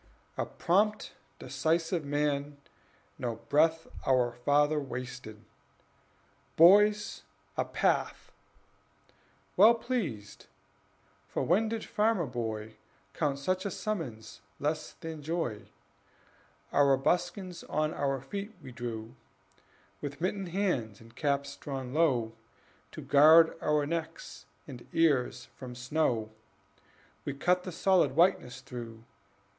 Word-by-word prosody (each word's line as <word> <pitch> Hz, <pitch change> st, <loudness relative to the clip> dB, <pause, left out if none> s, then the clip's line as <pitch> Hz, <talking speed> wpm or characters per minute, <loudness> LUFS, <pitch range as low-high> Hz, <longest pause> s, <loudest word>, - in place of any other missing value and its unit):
A -, -, -2 dB
prompt, 210 Hz, +4 st, +1 dB, 0.3 s
decisive 160 Hz, +6 st, -1 dB
man, 145 Hz, 0 st, -1 dB, 0.6 s
no 120 Hz, -3 st, -2 dB
breath 160 Hz, +7 st, +2 dB, 0.2 s
Our 125 Hz, -2 st, +2 dB
father 145 Hz, +5 st, +2 dB
wasted: 125 Hz, -5 st, -7 dB, 1.1 s
"Boys, 205 Hz, +5 st, +5 dB, 0.3 s
a -, -, 0 dB
path!" -, -, -1 dB, 1.2 s
Well 220 Hz, +5 st, +7 dB
pleased, 195 Hz, -, -4 dB, 0.8 s
(for -, -, -2 dB
when 210 Hz, +6 st, +2 dB
did 225 Hz, 0 st, -4 dB
farmer 210 Hz, -5 st, +1 dB
boy 110 Hz, -3 st, -5 dB, 0.4 s
Count 140 Hz, -2 st, -1 dB
such 185 Hz, +7 st, -1 dB
a 200 Hz, -, -2 dB
summons 165 Hz, -, -5 dB, 0.2 s
less 155 Hz, +1 st, -2 dB
than 160 Hz, -2 st, -8 dB
joy?) 150 Hz, -9 st, -3 dB, 1.0 s
Our 140 Hz, -2 st, +4 dB
buskins 180 Hz, +5 st, -1 dB
on 155 Hz, +1 st, -1 dB
our 135 Hz, -1 st, -1 dB
feet 200 Hz, -, -6 dB
we 130 Hz, -, -11 dB
drew; 115 Hz, -2 st, -6 dB, 0.9 s
With 145 Hz, -1 st, -6 dB
mittened 185 Hz, +1 st, -2 dB
hands, 165 Hz, -, -1 dB
and 115 Hz, +1 st, -17 dB
caps 140 Hz, -1 st, -1 dB
drawn 135 Hz, -3 st, -6 dB
low, 130 Hz, -8 st, +2 dB, 0.6 s
To -, -, -8 dB
guard 160 Hz, +3 st, +7 dB
our 150 Hz, -1 st, +2 dB
necks 165 Hz, +1 st, -5 dB, 0.2 s
and 120 Hz, -2 st, -10 dB
ears 135 Hz, -6 st, +2 dB
from 125 Hz, -2 st, -9 dB
snow, 125 Hz, -4 st, -1 dB, 0.9 s
We 140 Hz, -, -4 dB
cut 180 Hz, +5 st, +1 dB
the 185 Hz, -, -4 dB
solid 175 Hz, -6 st, +2 dB
whiteness 160 Hz, -7 st, +2 dB
through. 120 Hz, -4 st, -9 dB
145 Hz, 110 wpm, -30 LUFS, 125-175 Hz, 1.2 s, Well